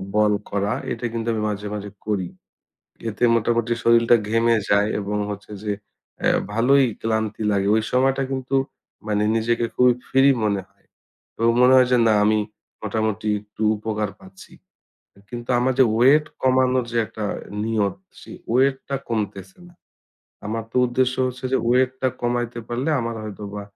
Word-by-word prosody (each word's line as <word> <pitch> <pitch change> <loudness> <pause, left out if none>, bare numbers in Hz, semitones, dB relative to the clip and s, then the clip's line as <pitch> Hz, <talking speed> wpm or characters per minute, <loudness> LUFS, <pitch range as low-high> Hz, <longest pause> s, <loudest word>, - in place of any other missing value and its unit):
বল 105 -1 +4 0.2
করা 100 +1 -1 0.2
এটা 120 - -4
কিন্তু 115 0 -3
আমি 110 - -2
মাঝে, 105 0 -4
মাঝে 105 -1 -6 0.2
করি। 100 -4 -1 0.8
এতে 105 +3 -5
মোটামুটি 115 +1 +1
শরীরটা 115 0 +5
ঘেমে 115 +1 +3
যায় 100 +1 +3
এবং 105 +1 -3
হচ্ছে 105 +1 -7
যে, 105 - -1 0.5
অ্যা - - +2 0.2
ভালোই 135 +4 +4 0.2
ক্লান্তি 110 -1 -2
লাগে। 100 -1 +1
ঐ - - +4 0.2
সময়টা 135 +1 +2
কিন্তু 130 0 -2 0.5
মানে 105 -1 +1
নিজেকে 115 +1 +1
খুবই 125 -1 +5
free 135 +1 +4
মনে 100 -2 0
হয়। - - -36 0.5
তো - - -8 0.2
মনে 125 +1 +6
হয় 125 -1 +5
যে, - - +5
না 110 - +4
আমি 110 0 +3 0.5
মোটামুটি 110 0 -2
একটু 105 +1 -14 0.2
উপকার 105 -1 -2
পাচ্ছি। 95 0 -15 0.8
কিন্তু 120 -1 -7
আমার 130 +2 +2
যে, 130 - +7
ওয়েট 140 +6 +5 0.2
কমানোর 130 -1 +3
যে, 120 - -2
একটা 105 +2 -6 0.4
নিয়ত 110 -3 0 0.2
সেই - - -11 0.2
weight 135 +1 +3
টা 135 - 0
কমতেছে 100 -4 -4
না। 175 - -20 0.7
আমার 115 +1 -3
তো - - -5
উদ্দেশ্য 125 +1 +1
হচ্ছে 130 +1 -9
যে, - - +3
ওয়েট 130 +1 +3
টা 130 - +3
কমাইতে 120 -1 -1
পারলে 120 +5 -2
আমার 115 -1 -3
হয়তোবা 105 -1 -7
115 Hz, 160 wpm, -22 LUFS, 105-125 Hz, 0.8 s, যে